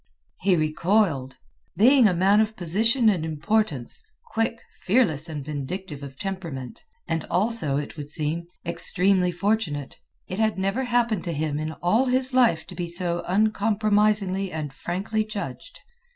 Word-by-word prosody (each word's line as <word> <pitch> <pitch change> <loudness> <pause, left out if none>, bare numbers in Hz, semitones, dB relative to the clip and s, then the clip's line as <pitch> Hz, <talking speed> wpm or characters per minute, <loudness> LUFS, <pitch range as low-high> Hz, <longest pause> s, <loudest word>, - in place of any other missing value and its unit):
He 190 0 +3
recoiled. 155 -4 +1 0.4
Being 250 +2 +6
a 190 - +2
man 195 +4 +4
of 220 0 +1
position 225 +8 +2
and 185 -7 +3
importance, 160 - 0 0.3
quick, 225 0 0 0.2
fearless, 180 - +1
and 150 -3 -5
vindictive 150 +2 -5
of 140 -1 -9
temperament—and 165 -3 -5
also, 180 -6 0
it 145 +2 -5
would 145 -1 -6
seem, 160 +3 -3 0.2
extremely 180 +2 +2
fortunate—it 185 -2 -3
had 220 -2 +1
never 195 +7 0
happened 235 -5 +1
to 170 - -2
him 150 -1 -2
in 155 +1 -3
all 220 +9 +3
his 255 +1 +1
life 240 -10 +3
to - - -10
be 175 -1 -3
so 170 0 -1
uncompromisingly 210 -1 +2
and 150 -3 -4
frankly 195 +9 -2
judged. 215 - -7
185 Hz, 135 wpm, -25 LUFS, 155-215 Hz, 0.4 s, Being